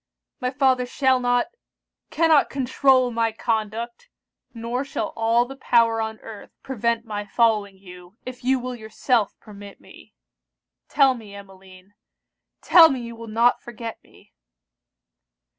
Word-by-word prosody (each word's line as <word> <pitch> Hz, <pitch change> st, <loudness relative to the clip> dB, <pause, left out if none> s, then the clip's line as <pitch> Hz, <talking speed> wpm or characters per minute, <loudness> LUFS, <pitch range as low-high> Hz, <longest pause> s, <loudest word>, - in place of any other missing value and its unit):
My 250 Hz, -2 st, -1 dB
father 255 Hz, -1 st, +1 dB
shall 260 Hz, 0 st, +1 dB
not 245 Hz, 0 st, +1 dB, 0.6 s
cannot 320 Hz, -3 st, +3 dB
controul 260 Hz, -1 st, +2 dB
my 230 Hz, -1 st, 0 dB
conduct; 225 Hz, -, -4 dB, 0.4 s
nor 235 Hz, +2 st, -4 dB
shall 275 Hz, -6 st, -4 dB
all 230 Hz, +1 st, +2 dB
the 270 Hz, +2 st, -10 dB
power 230 Hz, -4 st, +2 dB
on 220 Hz, 0 st, -4 dB
earth 220 Hz, -2 st, -11 dB
prevent 235 Hz, -3 st, -2 dB
my 210 Hz, -2 st, -5 dB
following 210 Hz, -2 st, 0 dB
you, 180 Hz, +1 st, -15 dB
if 255 Hz, -1 st, -9 dB
you 260 Hz, +1 st, +2 dB
will 255 Hz, 0 st, -5 dB
yourself 220 Hz, 0 st, -1 dB
permit 205 Hz, -2 st, -13 dB
me. -, -, -18 dB, 0.7 s
Tell 275 Hz, -2 st, +4 dB
me, 215 Hz, -5 st, -11 dB
Emmeline, 190 Hz, -1 st, -15 dB, 0.7 s
tell 330 Hz, -2 st, +8 dB
me 265 Hz, -4 st, -3 dB
you 235 Hz, 0 st, -8 dB
will 230 Hz, 0 st, -10 dB
not 230 Hz, +3 st, +2 dB
forget 230 Hz, -1 st, -8 dB
me!' -, -, -23 dB
235 Hz, 135 wpm, -23 LUFS, 215-255 Hz, 0.7 s, tell